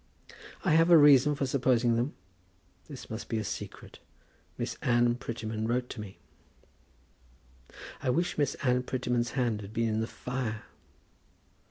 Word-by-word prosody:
"I 180 - +3
have 165 +2 +5
a 170 - +9
reason 145 -1 +6
for 140 - -1
supposing 125 -3 +2
them. 120 +5 -1 0.7
This 140 -4 -9
must 110 +1 -6
be 115 - -1
a 110 - -2
secret. - - -7 0.6
Miss - - -3
Anne 120 -1 +3
Prettyman 110 -3 -4
wrote 125 +1 -1
to 110 - -6
me." 100 -2 -10 1.8
"I - - -1
wish 170 +7 0
Miss 145 -2 0
Anne 125 -1 +2
Prettyman's 125 -1 -2
hand 120 -5 0
had 100 +1 -10
been 115 0 0
in 110 0 0
the 110 - -2
fire." 125 -4 -4
125 Hz, 150 wpm, -29 LUFS, 115-135 Hz, 1.8 s, a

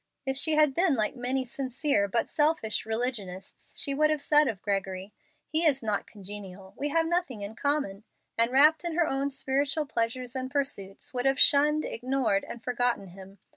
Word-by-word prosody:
If 265 0 -1
she 305 +3 +5
had 300 -3 +4
been 340 -1 +2
like 215 0 -1
many 255 +1 -1
sincere 260 -3 -1
but 230 +4 -1
selfish 300 -10 0
religionists, 220 -5 -5
she 280 - 0
would 305 +2 +2
have 305 -1 0
said 295 +1 +4
of 205 -6 -4
Gregory, 195 -1 -3 0.3
"He 320 +1 0
is 280 -6 +2
not 210 -2 -2
congenial. 195 -2 -9
We 290 - -2
have 325 +2 +1
nothing 335 - -1
in 200 +2 -6
common," 285 -9 -1 0.3
and, 230 +1 +3
wrapped 300 +5 +5
in 340 -2 -3
her 345 -1 +3
own 275 +1 -1
spiritual 280 +3 -1
pleasures 245 0 -2
and 260 0 -3
pursuits, 265 -10 -1
would 250 +1 0
have 270 +1 +1
shunned, 300 +2 +5
ignored, 245 -5 -1
and 235 - -9
forgotten 245 -5 -1
him. 190 +2 -13
260 Hz, 180 wpm, -28 LUFS, 210-290 Hz, 0.3 s, she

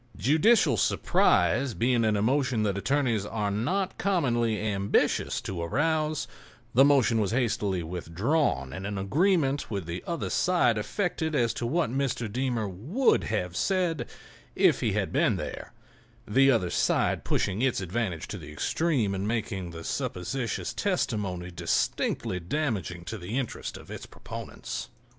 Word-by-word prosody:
Judicial 180 - +4
surprise 130 -1 +2
being 120 0 +2
an 110 -1 +2
emotion 125 +1 +1
that 100 -2 0
attorneys 120 -1 +1
are 105 -1 -2
not 180 - -1
commonly 120 - +1
ambitious 100 -2 +1
to 90 -3 -4
arouse, 155 - 0 0.5
the 130 - +7
motion 130 -5 +4
was 100 - 0
hastily 105 -7 0
withdrawn 85 - -1
and 95 +5 -5
an 105 -1 -3
agreement 145 - +1
with 100 -5 -3
the 85 +2 -5
other 170 -1 -3
side 175 -10 +3
effected 160 - -2
as 120 -4 +2
to 120 - -3
what 155 0 0
Mr. 130 -3 -1
Deemer 120 -2 -1
would 140 - +1
have 90 -5 -2
said 175 - 0 0.5
if - - +4
he - - 0
had - - -1
been - - +3
there—the 135 +6 -2
other 110 -9 +2
side - - +1
pushing 100 +3 0
its 130 -4 +2
advantage 95 -2 -3
to 105 - -6
the 75 -2 -10
extreme 120 - 0
and 95 +1 -2
making 105 -5 -2
the 80 -1 -8
supposititious 115 +11 -3
testimony 100 - -1
distinctly 90 +1 -1
damaging 95 - -2
to 110 +5 -5
the 100 +8 -4
interests 130 -4 -4
of - - -13
its - - -7
proponents. - - -7
115 Hz, 145 wpm, -28 LUFS, 95-140 Hz, 0.5 s, the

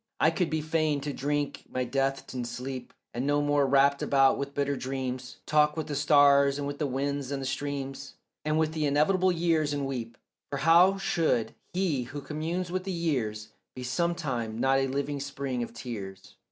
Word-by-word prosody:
I 155 - +5
could 170 0 0
be 155 0 -1
fain 155 -1 +1
to 145 0 -3
drink 145 +1 -2
my 130 - -1
death 135 +2 -1
and 125 -2 -3
sleep, 125 +2 -6 0.2
And 125 +3 -2
no 145 0 +3
more 145 -1 +2
wrapped 140 +1 +4
about 135 -1 +4
with 140 0 -4
bitter 140 0 0
dreams 130 -1 -4
Talk 150 0 +3
with 160 - -2
the 150 -1 -4
stars 140 -1 +5
and 145 - -3
with 145 0 -5
the 150 - 0
winds 140 +1 -2
and 135 -2 -3
streams 140 0 -4 0.3
And 155 0 +1
with 160 0 +1
the 155 -2 0
inevitable 180 +6 +3
years, 165 -3 +1
and 145 -1 -1
weep; 120 -4 -5 0.3
For 140 - -3
how 170 +7 +5
should 165 - 0 0.2
he 170 -9 0
who 145 +4 -7
communes 165 +5 -3
with 185 0 -2
the 195 - -3
years 120 -11 -2 0.3
Be 130 - -6
sometime 135 -7 -1
not 135 +2 +3
a 135 - +1
living 140 +2 -2
spring 140 -2 -3
of 120 - -4
tears? 95 -6 -8
140 Hz, 190 wpm, -28 LUFS, 135-155 Hz, 0.3 s, I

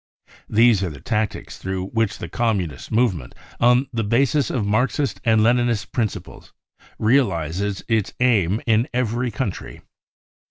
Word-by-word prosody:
These 115 -2 +4
are 95 - -1
the 75 -3 -10
tactics 105 +6 -3
through 95 0 -4
which 115 -3 -1
the - - -6
Communist 100 -10 -2
movement, 110 - 0 0.2
on 125 +3 +4
the 115 -1 -1
basis 130 +5 +1
of 115 -6 -1
Marxist 125 +3 0
and 110 -1 +3
Leninist 120 -2 +1
principles, 115 -4 -4 0.4
realises 100 - 0
its 110 -4 0
aims 110 -5 +2
in 115 +1 +2
every 125 0 0
country. 110 -3 -5
110 Hz, 130 wpm, -22 LUFS, 100-120 Hz, 0.4 s, These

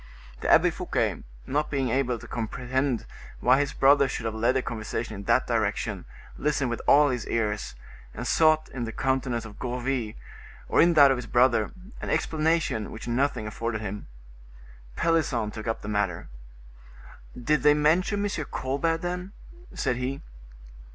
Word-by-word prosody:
The - - 0
Abbe - - +6
Fouquet, - - -1 0.2
not 150 +3 -1
being 135 -3 -1
able 125 -1 0
to - - -12
comprehend 125 +2 -2 0.3
why 130 +2 +4
his 145 0 0
brother 140 0 +4
should 125 -3 -4
have 110 - -1
led 115 +4 +1
the 130 - +1
conversation 110 0 -4
in 100 -1 -8
that - - +3
direction, - - -1 0.3
listened 140 -4 0
with 120 - -3
all 145 +1 +6
his 125 -3 -3
ears, 105 - -2 0.4
and - - -6
sought 155 -1 +3
in 125 -3 -4
the 115 - -5
countenance 130 -2 -1
of 105 -2 -11
Gourville, 125 -2 -2 0.5
or - - +4
in 170 0 +4
that 140 -3 +8
of 135 - +1
his 120 - -7
brother, 120 -3 +3 0.3
an - - -4
explanation 155 -8 0
which 110 - -8
nothing 120 -1 0
afforded 110 +1 -3
him. 105 -1 -6 0.9
Pelisson 140 -10 +1
took 110 +1 -7
up 115 - -2
the - - -6
matter:—"Did - - -5
they 150 +1 +5
mention 180 +7 +2
M. 205 - -1 0.2
Colbert, 165 +6 -1
then?" 180 +2 -4 0.4
said 125 - 0
he. 130 +2 -3
125 Hz, 160 wpm, -26 LUFS, 110-145 Hz, 0.9 s, that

